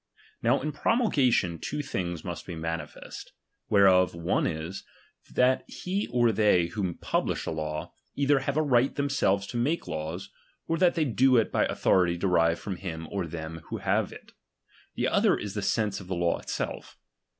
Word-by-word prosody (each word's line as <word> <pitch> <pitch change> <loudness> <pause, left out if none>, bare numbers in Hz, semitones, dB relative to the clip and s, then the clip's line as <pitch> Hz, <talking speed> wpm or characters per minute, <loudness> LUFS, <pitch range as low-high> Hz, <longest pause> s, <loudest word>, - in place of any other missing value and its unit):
Now 120 +4 +3
in 150 +2 -2
promulgation 140 - +2
two 150 0 -3
things 85 - -4
must 85 -2 -6
be 90 - -5
manifest; 80 +1 -6 0.4
whereof 95 -3 +5
one 85 0 0
is, 80 +4 -4 0.5
that 130 +1 +3
he 195 +3 -3
or 120 -2 +3
they 100 -5 +3
who 95 -3 -2
publish - - -1
a - - -2
law, 75 -1 -4 0.2
either 140 0 +3
have 140 +2 -2
a 155 - +3
right 130 -2 +2
themselves 140 -9 +1
to 120 - -5
make 145 - 0
laws, 85 +4 -5 0.4
or 165 - 0
that 180 -1 +4
they 160 -3 +2
do 130 0 +4
it 115 - +2
by - - +2
authority 90 -2 +2
de 90 - -3
rived 85 -2 +3
from 95 -3 -5
him 80 -3 -6
or 95 -4 -2
them 80 0 -6
who - - -5
have - - 0
it; - - -13 0.6
the - - 0
other - - +3
is 100 -2 -5
the 105 - -3
sense 105 0 0
of 95 - -11
the 95 - -2
law 85 -1 +1
itself. - - -5
100 Hz, 180 wpm, -28 LUFS, 85-130 Hz, 0.6 s, whereof